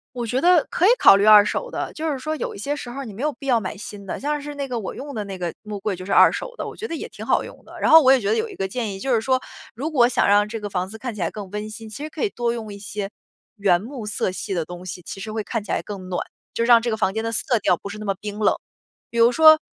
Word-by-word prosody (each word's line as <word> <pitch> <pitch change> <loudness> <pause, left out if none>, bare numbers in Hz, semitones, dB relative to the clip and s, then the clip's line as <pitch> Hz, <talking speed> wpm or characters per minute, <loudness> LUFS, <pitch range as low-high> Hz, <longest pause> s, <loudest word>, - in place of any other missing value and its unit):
我 240 -1 -3
觉 250 +3 -1
得 350 -2 +5
可 360 - +2
以 - - +7
考 - - +8
虑 200 +1 +2
二 210 -1 +9
手 - - -2
的， - - -4
就 315 -1 -2
是 275 - -2
说 310 +4 -3
有 - - -4
一 - - -9
些 280 +8 -2
时 255 - -7
候 265 +3 -7
儿 270 - -6
你 215 - -8
没 210 - -8
有 300 +1 +1
必 275 - -12
要 250 -4 +3
买 195 -2 -5
新 205 0 -9
的。 - - -5
像 295 +1 -2
是 290 0 -7
那 280 -1 -3
个 245 -2 -3
我 195 - -6
用 285 +1 -7
的 215 -4 -3
那 195 -1 -6
个 175 -2 -3
木 210 -1 -6
柜 200 -1 -2
就 185 +1 -9
是 200 - -5
二 - - +7
手 - - -6
的， - - -4
我 - - -8
觉 450 - -5
得 330 - -4
也 - - -5
挺 - - -9
好 - - +2
用 - - -12
的。 - - -12
然 - - +2
后 320 - +10
我 265 -2 +6
也 270 - +6
觉 205 -3 -2
得 220 - +3
有 450 - -1
一 - - -10
个 195 - -2
建 220 -1 -3
议， 195 - -8
就 265 +4 0
是 225 - +2
说， 260 +2 +2 0.4
如 295 +8 -3
果 245 -5 +5
想 250 - +2
让 205 +1 +4
这 225 +1 -5
个 205 -1 -5
房 185 -1 -2
子 220 - -9
看 245 0 -5
起 210 - -7
来 170 - +1
更 200 -3 -8
温 210 +1 -4
馨， 220 +1 -9
其 220 +8 -8
实 310 - -5
可 310 - -5
以 420 - +2
多 240 -6 -1
用 220 -3 -6
一 200 - -9
些 200 0 -5 0.5
原 190 -3 +3
木 240 -1 -7
色 200 -2 -1
系 190 - -5
的 170 -3 -1
东 175 +2 -9
西， 180 0 -6
其 195 - -8
实 215 +2 -6
会 215 -1 -3
看 220 +3 -3
起 205 - -6
来 - - 0
更 195 -3 -7
暖， 180 - -2 0.3
就 230 - 0
让 235 -1 +6
这 240 - -1
个 220 - -1
房 195 -3 +1
间 220 +1 -2
的 230 - -2
色 230 +1 +1
调 180 -3 +2
不 200 - -8
是 210 +1 -7
那 215 - -6
么 195 - 0
冰 210 0 -6
冷。 210 - +3 0.5
比 235 - -6
如 230 +1 +6
说， 315 +2 +8
220 Hz, 365 characters per minute, -23 LUFS, 200-265 Hz, 0.5 s, 后